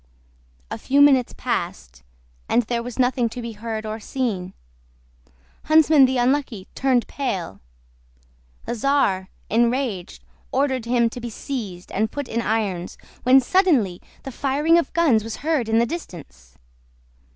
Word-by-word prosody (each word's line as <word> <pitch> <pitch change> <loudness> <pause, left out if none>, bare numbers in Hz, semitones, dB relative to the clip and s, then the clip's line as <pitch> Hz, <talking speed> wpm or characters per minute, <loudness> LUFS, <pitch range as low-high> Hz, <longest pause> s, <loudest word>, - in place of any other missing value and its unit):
A - - -4
few 280 +2 +1
minutes 275 -4 +5
passed, - - -4 0.5
and 240 - +3
there 235 +1 -2
was 240 0 -7
nothing 245 -2 +1
to 230 - -8
be 235 -1 -5
heard 220 0 -5
or 215 +1 -4
seen. 210 -7 -3 1.1
Huntsman 310 -2 +6
the 260 0 0
Unlucky 245 -5 0
turned 260 -3 +1
pale; 190 - -4 1.1
the - - -3
czar, 225 -7 +1 0.2
enraged, 235 -4 0 0.3
ordered 265 -3 0
him 235 0 +2
to 245 - -8
be 240 - -5
seized 210 -7 -6
and 215 +2 -1
put 285 -2 -5
in 230 - -2
irons, 205 -6 -2 0.2
when 260 +2 +6
suddenly 265 - +2 0.2
the 270 - -6
firing 295 +6 +2
of 335 - -3
guns 285 -11 +3
was 225 0 -5
heard 300 -8 0
in 225 - +3
the 235 - +4
distance. 140 - -9
240 Hz, 140 wpm, -22 LUFS, 215-270 Hz, 1.1 s, Huntsman